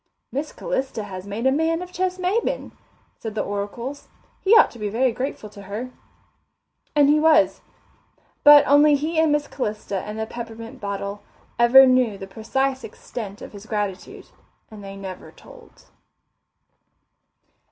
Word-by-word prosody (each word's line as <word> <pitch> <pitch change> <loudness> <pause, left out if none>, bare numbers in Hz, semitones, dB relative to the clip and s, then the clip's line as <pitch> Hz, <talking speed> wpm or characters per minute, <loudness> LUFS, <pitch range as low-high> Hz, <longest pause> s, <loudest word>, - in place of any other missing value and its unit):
"Miss 285 +4 -3
Calista 265 - -3
has 190 -1 -8
made 210 +5 -4
a 265 - +5
man 325 +4 0
of 360 - -11
Ches 370 0 -2
Maybin," 375 +6 -1 0.5
said 220 -2 -6
the - - 0
oracles. 235 +7 -5 0.3
"He 400 +4 +4
ought 450 - +6
to 235 - -13
be 210 -1 -2
very 245 +4 +1
grateful 250 -2 -5
to 205 -1 -12
her." 210 +6 -6 1.0
And 290 -1 +5
he 300 +1 +4
was. 315 -1 +4 0.8
But 290 0 +9
only 290 +1 +5
he 315 +3 -1
and 320 -1 +3
Miss 295 0 0
Calista 210 -5 -4
and 210 +3 -7
the 220 - -2
peppermint 230 0 -9
bottle 200 0 -4 0.4
ever 250 +3 +8
knew 255 -5 +2
the 195 - -7
precise 260 +7 -2
extent 210 -4 -8
of - - -10
his 205 +1 -11
gratitude, 205 -4 -4 0.4
and 210 -2 -11
they 195 0 -8
never 190 -2 -8
told. - - -17
240 Hz, 150 wpm, -23 LUFS, 205-290 Hz, 1.0 s, But